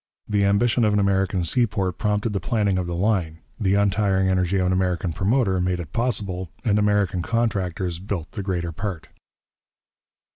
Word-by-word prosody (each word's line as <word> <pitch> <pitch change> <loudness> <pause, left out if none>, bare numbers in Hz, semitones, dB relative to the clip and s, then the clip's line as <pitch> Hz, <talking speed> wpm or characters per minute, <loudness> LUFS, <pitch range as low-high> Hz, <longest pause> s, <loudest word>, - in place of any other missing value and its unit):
The 100 -1 +2
ambition 110 +4 +2
of 105 -1 +3
an 105 - +3
American 95 -2 +1
seaport 100 -2 0
prompted 105 +1 0
the 100 - 0
planning 100 -2 0
of 90 - -3
the 85 - -3
line, 90 -4 0 0.2
the 100 -3 +2
untiring 100 -2 +2
energy 95 0 +1
of 90 - +1
an 90 - +2
American 90 -2 0
promoter 95 - +1
made 90 0 0
it 85 -3 -8
possible, 100 -7 -2 0.2
and 105 -2 +3
American 105 -3 +1
contractors 95 -5 -1
built 90 -3 -5
the 100 - -5
greater 90 -3 -2
part. 95 -1 -5
95 Hz, 170 wpm, -23 LUFS, 90-105 Hz, 0.2 s, of